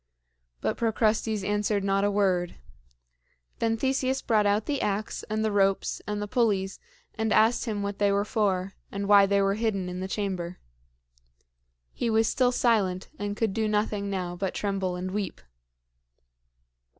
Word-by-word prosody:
But -, -, -1 dB
Procrustes 220 Hz, -2 st, +1 dB
answered 205 Hz, 0 st, 0 dB
not 195 Hz, 0 st, +1 dB
a 205 Hz, -, +3 dB
word. 190 Hz, -4 st, +1 dB, 1.0 s
Then 225 Hz, 0 st, +1 dB
Theseus 265 Hz, +1 st, 0 dB
brought 215 Hz, -3 st, +3 dB
out 205 Hz, +1 st, +1 dB
the 285 Hz, -2 st, -1 dB
ax 205 Hz, +1 st, -2 dB
and 215 Hz, +1 st, 0 dB
the 215 Hz, -, +1 dB
ropes 195 Hz, -1 st, +1 dB
and 210 Hz, 0 st, -2 dB
the 205 Hz, -, -3 dB
pulleys, 205 Hz, -5 st, 0 dB, 0.3 s
and 220 Hz, 0 st, -1 dB
asked 220 Hz, +4 st, +4 dB
him 210 Hz, -3 st, -2 dB
what 200 Hz, 0 st, -4 dB
they 205 Hz, -1 st, +3 dB
were 200 Hz, +1 st, +1 dB
for, 195 Hz, -3 st, 0 dB, 0.2 s
and 200 Hz, 0 st, -3 dB
why 200 Hz, -1 st, +7 dB
they 200 Hz, 0 st, +3 dB
were 195 Hz, 0 st, +2 dB
hidden 205 Hz, -4 st, -1 dB
in 180 Hz, 0 st, -5 dB
the 190 Hz, -, -3 dB
chamber. 185 Hz, -3 st, -3 dB, 1.4 s
He 235 Hz, -, -1 dB
was 225 Hz, 0 st, +3 dB
still 250 Hz, -1 st, +2 dB
silent, 205 Hz, -7 st, +1 dB
and 205 Hz, 0 st, -3 dB
could 220 Hz, -4 st, 0 dB
do 220 Hz, 0 st, 0 dB
nothing 210 Hz, -1 st, 0 dB
now 180 Hz, -3 st, -3 dB
but 190 Hz, +1 st, -3 dB
tremble 195 Hz, -3 st, -1 dB
and 185 Hz, +1 st, -4 dB
weep. 200 Hz, -2 st, -3 dB
205 Hz, 160 wpm, -27 LUFS, 195-220 Hz, 1.4 s, why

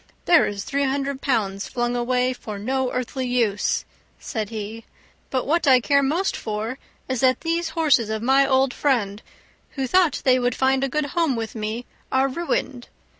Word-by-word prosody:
"There 340 Hz, -2 st, +5 dB
is 200 Hz, -1 st, -4 dB
three 280 Hz, +3 st, -1 dB
hundred 275 Hz, 0 st, -2 dB
pounds 200 Hz, -7 st, -1 dB
flung 240 Hz, 0 st, -1 dB
away 250 Hz, +1 st, +1 dB
for 215 Hz, -4 st, -7 dB
no 260 Hz, +5 st, -1 dB
earthly 255 Hz, +1 st, -3 dB
use," 230 Hz, -5 st, 0 dB, 0.3 s
said 220 Hz, -5 st, -4 dB
he; 220 Hz, +1 st, -6 dB, 0.5 s
"but 260 Hz, -2 st, -1 dB
what 325 Hz, +1 st, +1 dB
I 260 Hz, -2 st, +7 dB
care 280 Hz, +3 st, +3 dB
most 320 Hz, +8 st, 0 dB
for 220 Hz, +4 st, -4 dB, 0.3 s
is 260 Hz, -2 st, -2 dB
that 255 Hz, 0 st, +3 dB
these 335 Hz, 0 st, -1 dB
horses 280 Hz, -9 st, +3 dB
of 220 Hz, 0 st, -3 dB
my 270 Hz, +2 st, +5 dB
old 265 Hz, -1 st, +2 dB
friend, 215 Hz, -8 st, 0 dB, 0.5 s
who 270 Hz, -2 st, -2 dB
thought 345 Hz, +4 st, +2 dB
they 255 Hz, -1 st, +5 dB
would 245 Hz, -1 st, 0 dB
find 265 Hz, 0 st, +2 dB
a 275 Hz, -, 0 dB
good 300 Hz, +3 st, 0 dB
home 330 Hz, -6 st, +1 dB
with 225 Hz, -1 st, -4 dB
me, 220 Hz, +2 st, -4 dB, 0.3 s
are 265 Hz, +1 st, +3 dB
ruined. 305 Hz, -, -3 dB
255 Hz, 175 wpm, -23 LUFS, 230-275 Hz, 0.5 s, I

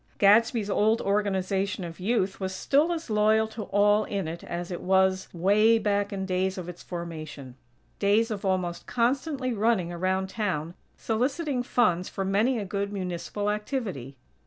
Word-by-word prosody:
Gadsby's 215 Hz, +1 st, +4 dB
old 215 Hz, +2 st, +2 dB
Organization 195 Hz, -1 st, 0 dB
of 170 Hz, 0 st, -7 dB
Youth 195 Hz, -1 st, 0 dB
was 190 Hz, -1 st, -3 dB
still 290 Hz, -, +2 dB
as 325 Hz, -8 st, -4 dB
loyal 215 Hz, +1 st, +3 dB
to 220 Hz, -1 st, -6 dB
all 205 Hz, +1 st, +3 dB
in 195 Hz, -5 st, -3 dB
it 165 Hz, +2 st, -6 dB
as 175 Hz, +1 st, -5 dB
it 175 Hz, -, -4 dB
was, 190 Hz, 0 st, +2 dB
way 205 Hz, +6 st, +4 dB
back 205 Hz, -2 st, 0 dB
in 195 Hz, -1 st, -3 dB
days 190 Hz, 0 st, -1 dB
of 180 Hz, -2 st, -6 dB
its 180 Hz, -1 st, -8 dB
formation; 155 Hz, -6 st, -7 dB, 0.5 s
days 215 Hz, +3 st, +3 dB
of 205 Hz, -2 st, -4 dB
almost 185 Hz, -3 st, -1 dB
constantly 255 Hz, +2 st, 0 dB
running 210 Hz, -5 st, +1 dB
around 185 Hz, +2 st, 0 dB
town, 180 Hz, -7 st, -2 dB, 0.2 s
soliciting 260 Hz, +4 st, -1 dB
funds 185 Hz, -8 st, +1 dB
for 195 Hz, -, -3 dB
many 215 Hz, +7 st, +2 dB
a 210 Hz, -, -3 dB
good 200 Hz, +1 st, -3 dB
Municipal 190 Hz, +2 st, -3 dB
activity. 210 Hz, -, -4 dB
200 Hz, 160 wpm, -27 LUFS, 185-220 Hz, 0.5 s, Gadsby's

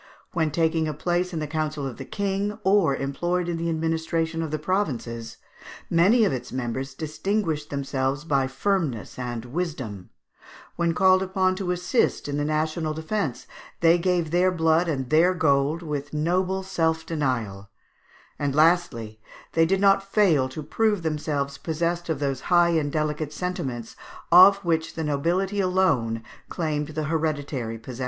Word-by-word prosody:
When 160 Hz, -4 st, +1 dB
taking 160 Hz, +1 st, +1 dB
a 155 Hz, -, -3 dB
place 175 Hz, +3 st, -1 dB
in 170 Hz, -, -4 dB
the 155 Hz, -, -2 dB
council 155 Hz, -1 st, -2 dB
of 130 Hz, -3 st, -5 dB
the 135 Hz, -, -7 dB
King, 200 Hz, +4 st, -2 dB
or 190 Hz, -7 st, +3 dB
employed 175 Hz, +7 st, -1 dB
in 170 Hz, -1 st, -2 dB
the 170 Hz, 0 st, -2 dB
administration 160 Hz, 0 st, -1 dB
of 160 Hz, -, -3 dB
the 155 Hz, -, -2 dB
provinces, 130 Hz, -, -2 dB, 0.5 s
many 200 Hz, +8 st, +5 dB
of 170 Hz, -, +1 dB
its 130 Hz, -, -5 dB
members 130 Hz, +2 st, -4 dB
distinguished 160 Hz, 0 st, -2 dB
themselves 140 Hz, 0 st, -2 dB
by 140 Hz, -5 st, +1 dB
firmness 135 Hz, -, -2 dB
and 120 Hz, -2 st, -4 dB
wisdom; 125 Hz, -, -4 dB, 0.7 s
when 170 Hz, -1 st, 0 dB
called 185 Hz, +1 st, +5 dB
upon 185 Hz, 0 st, +1 dB
to 190 Hz, -2 st, -3 dB
assist 180 Hz, -, 0 dB
in 145 Hz, 0 st, -2 dB
the 145 Hz, -, 0 dB
national 155 Hz, +1 st, -1 dB
defence, 160 Hz, -, -3 dB, 0.4 s
they 170 Hz, +1 st, +5 dB
gave 175 Hz, -3 st, 0 dB
their 180 Hz, +2 st, +3 dB
blood 165 Hz, 0 st, +2 dB
and 135 Hz, -5 st, -2 dB
their 175 Hz, +4 st, +4 dB
gold 150 Hz, 0 st, +1 dB
with 145 Hz, -1 st, -4 dB
noble 185 Hz, +5 st, 0 dB
self 160 Hz, -3 st, 0 dB
denial; 115 Hz, -11 st, -2 dB, 0.7 s
and 140 Hz, -2 st, -1 dB
lastly, 150 Hz, -10 st, +2 dB, 0.3 s
they 165 Hz, 0 st, +4 dB
did 190 Hz, +2 st, +1 dB
not 195 Hz, 0 st, +5 dB
fail 160 Hz, -11 st, +3 dB
to 150 Hz, +4 st, -7 dB
prove 210 Hz, +4 st, 0 dB
themselves 145 Hz, -3 st, -2 dB
possessed 170 Hz, +1 st, -2 dB
of 160 Hz, -, 0 dB
those 135 Hz, -2 st, -2 dB
high 175 Hz, -1 st, +5 dB
and 155 Hz, -4 st, +1 dB
delicate 155 Hz, 0 st, -2 dB
sentiments 135 Hz, -10 st, -4 dB, 0.4 s
of 185 Hz, +3 st, +9 dB
which 160 Hz, -1 st, 0 dB
the 160 Hz, -, -3 dB
nobility 175 Hz, +7 st, 0 dB
alone 165 Hz, -, +1 dB, 0.3 s
claimed 150 Hz, -3 st, -2 dB
the 155 Hz, 0 st, -4 dB
hereditary 145 Hz, -7 st, -2 dB
possession. 120 Hz, +2 st, -9 dB
160 Hz, 155 wpm, -25 LUFS, 140-180 Hz, 0.7 s, of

